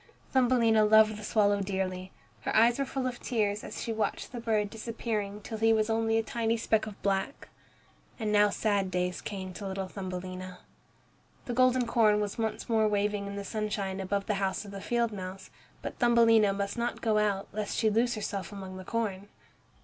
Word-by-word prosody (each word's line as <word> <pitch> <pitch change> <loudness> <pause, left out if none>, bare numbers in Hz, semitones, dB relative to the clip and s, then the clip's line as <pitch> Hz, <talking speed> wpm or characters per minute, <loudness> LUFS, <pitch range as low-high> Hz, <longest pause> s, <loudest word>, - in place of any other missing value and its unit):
Thumbelina 240 -4 +4
loved 215 0 +6
the 215 - -9
swallow 205 -1 +2
dearly. 190 -1 -3 0.3
Her - - -3
eyes 235 +3 +5
were 275 - +1
full 265 0 -3
of 250 -1 -3
tears 210 -3 -1
as - - -6
she 230 - -2
watched 215 -2 -2
the 245 - -5
bird 215 -3 0
disappearing 215 -2 -4
till 220 +1 -6
he 225 0 +4
was 220 0 +1
only 225 0 +2
a 225 - +1
tiny 230 0 0
speck 220 -1 +1
of 210 - -9
black. 195 +6 -1 0.7
And 215 -2 -1
now 210 0 +5
sad 200 -2 0
days 180 0 -1
came 190 -2 -6
to 200 +2 -6
little 190 0 -3
Thumbelina. 185 -1 -6 0.9
The 245 - -3
golden 255 0 +3
corn 220 -3 +3
was 210 +1 -3
once 220 -1 -2
more 220 -2 +3
waving 205 -1 0
in 200 - -6
the 200 0 -5
sunshine 205 -3 -2
above 195 +1 -1
the 215 - 0
house 195 +2 -1
of 200 - -9
the 195 -1 -7
field 235 0 0
mouse, 190 -1 -7 0.3
but - - -6
Thumbelina 230 -3 +5
must 200 +3 -3
not 235 - -2
go 215 -2 +2
out 200 -2 0
lest 210 -1 -3
she 220 -2 +3
lose 235 +3 +2
herself 200 -3 -4
among 190 -2 -7
the 185 - -8
corn. 205 -3 -2
210 Hz, 195 wpm, -29 LUFS, 195-225 Hz, 0.9 s, loved